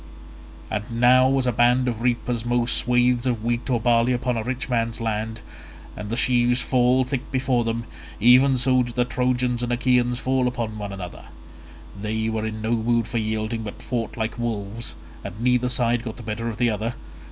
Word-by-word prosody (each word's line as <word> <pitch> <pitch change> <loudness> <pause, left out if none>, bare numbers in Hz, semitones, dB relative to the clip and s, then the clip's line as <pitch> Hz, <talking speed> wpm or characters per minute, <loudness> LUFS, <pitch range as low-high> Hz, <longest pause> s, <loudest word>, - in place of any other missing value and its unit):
And 110 +2 -3
now 130 +2 +5
as 130 - 0
a 125 - +2
band 120 +2 +3
of 115 -2 -2
reapers 120 -1 -1
mow 120 0 +1
swathes 125 +1 +2
of 115 -4 -1
wheat 120 +2 -1
or 120 -2 +2
barley 120 +1 +3
upon 125 0 -1
a 115 - -1
rich 125 +3 -3
man's 115 -2 -1
land, 110 0 -3 0.5
and 105 -1 -7
the 115 - -1
sheaves 120 0 +3
fall 125 0 +3
thick 130 0 -4
before 130 -2 +1
them, 115 0 -2 0.4
even 130 +4 +6
so 130 +1 +3
did 120 -1 -4
the 125 -1 +2
Trojans 125 -1 0
and 120 0 -2
Achaeans 125 0 +2
fall 130 0 +1
upon 115 -3 -3
one 100 -1 -5
another; 95 -3 -8 0.7
they 110 +2 -2
were 110 0 -2
in 110 0 -6
no 110 - -1
mood 115 0 +1
for 120 0 -2
yielding 110 +1 -2
but 105 -2 -7
fought 120 -2 -4
like 110 +1 -3
wolves, 115 -1 -4 0.3
and 105 - -7
neither 125 +1 +2
side 120 -1 +1
got 115 -3 -6
the 120 - -9
better 115 +2 -3
of 110 - -6
the 120 -1 +2
other. 110 +3 -3
120 Hz, 195 wpm, -23 LUFS, 110-125 Hz, 0.7 s, even